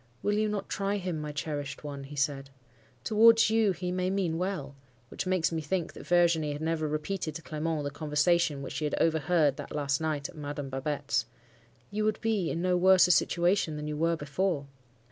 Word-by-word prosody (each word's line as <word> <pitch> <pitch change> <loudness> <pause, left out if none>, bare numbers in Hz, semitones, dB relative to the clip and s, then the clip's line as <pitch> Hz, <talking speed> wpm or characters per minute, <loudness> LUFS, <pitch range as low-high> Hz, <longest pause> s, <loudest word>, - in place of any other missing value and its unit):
"'Will 205 - +1
you 215 +1 +1
not 205 -2 -3
try 200 +1 -1
him, 180 -5 -3
my 150 0 -4
cherished 145 -1 -4
one?' 140 -2 -6
he 145 +2 -10
said. 135 -1 -1 0.5
'Towards 225 0 +5
you 220 -2 +3
he 180 0 -3
may 185 0 0
mean 185 -4 -1
well' 175 -7 -3 0.3
(which - - -5
makes 185 -3 +1
me 165 -1 -2
think 170 +3 -2
that - - -11
Virginie 170 -4 +3
had 145 - -6
never 160 -1 0
repeated 155 +1 -3
to 165 - -7
Clement 155 -1 -2
the 145 - -3
conversation 150 0 +1
which - - -6
she 155 - -2
had 150 - -1
overheard 160 -2 +2
that - - -7
last 140 -1 0
night 155 -2 -1
at - - -14
Madame 145 -2 -5
Babette's); 135 +2 -2 0.6
'you 215 +1 -1
would 215 0 0
be 215 -6 0
in 170 - -2
no 180 0 +2
worse 185 +1 +6
a 180 - +3
situation 175 -1 +2
than 150 0 -5
you 150 - -3
were 165 +2 +1
before! 150 +1 -1
160 Hz, 200 wpm, -29 LUFS, 145-185 Hz, 0.6 s, worse